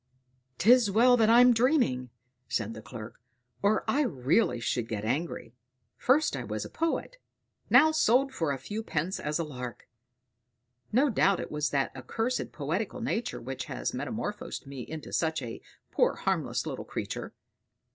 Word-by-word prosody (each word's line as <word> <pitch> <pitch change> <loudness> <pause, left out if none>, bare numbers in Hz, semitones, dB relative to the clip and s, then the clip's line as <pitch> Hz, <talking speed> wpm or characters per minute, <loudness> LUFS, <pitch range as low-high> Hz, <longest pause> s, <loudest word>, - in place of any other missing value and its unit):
"'Tis 240 +2 +5
well 240 +5 +5
that 225 -2 +3
I'm 245 +2 +7
dreaming," 230 - +2 0.4
said 110 -1 -1
the 110 - -9
clerk, 115 +1 -10 0.4
"or 205 +2 +2
I 290 - +2
really 135 - +1
should 120 0 -1
get 110 -2 -4
angry. 130 -2 -2 0.4
First 290 +5 +2
I - - -4
was - - -4
a - - -9
poet; 330 +9 -2 0.5
now 315 - +7
sold 270 -2 +3
for 165 - -1
a 140 - -2
few 210 +12 -5
pence 180 -3 -2
as 150 0 -1
a 170 - -1
lark; 125 -5 -7 1.0
no 270 +5 +3
doubt 195 -3 +3
it - - -5
was 150 0 0
that 135 -2 -1
accursed 225 - -2
poetical 165 - -3
nature 235 0 -2
which 130 +2 -5
has - - -3
metamorphosed - - -4
me 135 -2 -7
into 155 +5 -8
such 160 -1 +1
a 115 -1 -7 0.3
poor - - +2
harmless - - -1
little - - -4
creature. - - -5
170 Hz, 155 wpm, -29 LUFS, -, 1.0 s, I'm